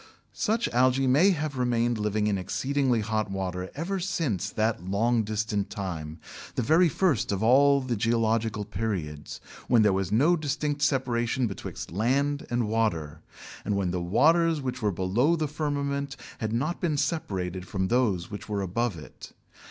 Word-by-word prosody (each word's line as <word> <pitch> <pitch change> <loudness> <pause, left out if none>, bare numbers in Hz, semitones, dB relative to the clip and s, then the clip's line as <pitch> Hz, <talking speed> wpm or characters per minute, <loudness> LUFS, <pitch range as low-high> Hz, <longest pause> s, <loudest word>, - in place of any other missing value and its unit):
Such 230 +2 0
algæ 130 +2 +3
may 150 +10 +5
have 150 -7 -2
remained 120 -2 +1
living 105 0 0
in 105 -1 +1
exceedingly 130 +4 0
hot 110 -1 -1
water 95 -1 -3
ever 180 +6 -2
since 140 - -1
that 110 +2 -1
long 110 +5 +1
distant 105 -1 -2
time, 85 -7 -5 0.4
the 125 - 0
very 160 +7 +4
first 155 - +1
of 100 +1 -1
all 140 +4 +5
the 130 -2 -2
geological 110 -1 0
periods, 95 -9 -4 0.3
when 115 -3 +5
there 105 -2 +4
was 95 -2 -1
no 145 +11 +4
distinct 145 -1 -2
separation 130 -3 +1
betwixt 100 -6 -6
land 140 +9 0
and 120 -2 0
water, 85 -9 -1 0.4
and 105 - -1
when 95 -3 0
the 90 -1 -2
waters 160 - +3
which 130 -3 -4
were 105 -1 +1
below 100 - +1
the 155 -2 -1
firmament 140 -2 -2 0.2
had 110 -1 -2
not 135 +9 -1
been 155 -4 0
separated 95 - -2
from 95 0 -2
those 110 -9 +1
which 105 +1 -7
were 100 -2 -1
above 100 +1 -1
it. 75 - -12
115 Hz, 160 wpm, -27 LUFS, 100-140 Hz, 0.4 s, may